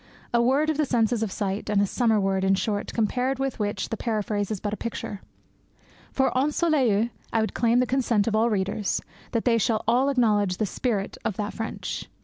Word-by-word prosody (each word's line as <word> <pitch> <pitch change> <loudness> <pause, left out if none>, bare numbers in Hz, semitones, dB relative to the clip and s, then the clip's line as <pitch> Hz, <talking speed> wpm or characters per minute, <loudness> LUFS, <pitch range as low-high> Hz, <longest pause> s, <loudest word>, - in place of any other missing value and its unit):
A 235 - +4
word 275 +6 +3
of 305 - -3
the 305 - +2
sense 230 -3 +2
of 225 -4 -1
sight, 200 0 -3
and 210 -1 +2
a 200 - +4
summer 225 +1 +2
word, 195 -1 0
in 190 0 +4
short, 205 +2 -2
compared 250 +4 0
with 270 -2 -2
which 205 -1 -2
the 225 - -3
paraphrase 210 -3 -1
is 215 -3 -3
but 205 +1 -3
a - - 0
picture. 215 -3 -5 0.9
For 265 - +2
ensoleille 260 -6 +2 0.2
I 225 - +2
would 220 - -1
claim 235 0 +2
the 250 - +4
consent 240 -4 +1
of 225 - 0
all 225 +2 +3
readers 200 0 -1 0.3
that 230 - 0
they 230 -2 +4
shall 220 -1 +1
all 250 +4 +3
acknowledge 210 -8 +2
the 215 - 0
spirit 205 0 -2
of 195 - -2
that 210 0 -3
French. 225 0 -5
225 Hz, 205 wpm, -25 LUFS, 205-245 Hz, 0.9 s, A